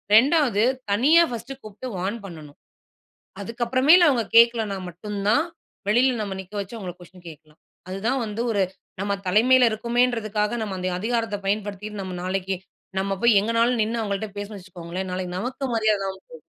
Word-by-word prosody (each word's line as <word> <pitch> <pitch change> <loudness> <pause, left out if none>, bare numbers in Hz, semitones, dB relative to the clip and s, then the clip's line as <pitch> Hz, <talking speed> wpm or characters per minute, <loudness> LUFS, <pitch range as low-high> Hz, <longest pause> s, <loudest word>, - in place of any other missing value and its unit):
2வது 260 -3 +4 0.3
தனியா 290 +11 +5
1ஸ்ட் 250 +4 -7
கூப்ட்டு 215 +4 -8
வார்ன் 190 +5 -2
பண்ணனும். 155 -6 -11 0.8
அதுக்கப்றமேல் 255 - +4
அவங்க 240 -4 +2
கேக்கலனா 230 -4 +4
மட்டும் 200 +4 -6
தான், 295 +9 +4 0.5
வெளில 245 +4 +4
நம்ம 200 -2 -4
நிக்க 190 +2 -17
வச்சு 200 +4 -8
அவங்கள 185 -4 -6
கொஷின் 180 0 -16
கேக்கலாம். 155 0 -16 0.3
அதுதான் 225 +8 -1
வந்து 215 +1 -4
ஒரு 205 -3 +1 0.4
நம்ம 200 0 -1
தலைமைல 245 +5 +5
இருக்கமோன்றதுக்காக, 230 -1 0
நம்ம 200 -3 -4
அந்த 185 0 -1
அதிகாரத்த 225 -1 -1
பயன்படுத்திட்டு, 205 0 -3 0.2
நாளைக்கு 190 +1 -2 0.4
நம்ம 195 0 -1
போய் 235 -4 +5
எங்கனாலும் 230 +3 +1
நின்னு 225 +2 -2
அவங்கள்ட்ட 205 0 -3
பேசுனோம்னு 205 -1 -6
வச்சுக்கோங்களேன், 180 +1 -6
நாளைக்கு 180 -1 -4
நமக்கு 255 +3 -3
மரியாத 215 -2 +2
இல்லாம 190 0 -5
போவும். 485 -1 -12
215 Hz, 150 wpm, -24 LUFS, 195-240 Hz, 0.8 s, தனியா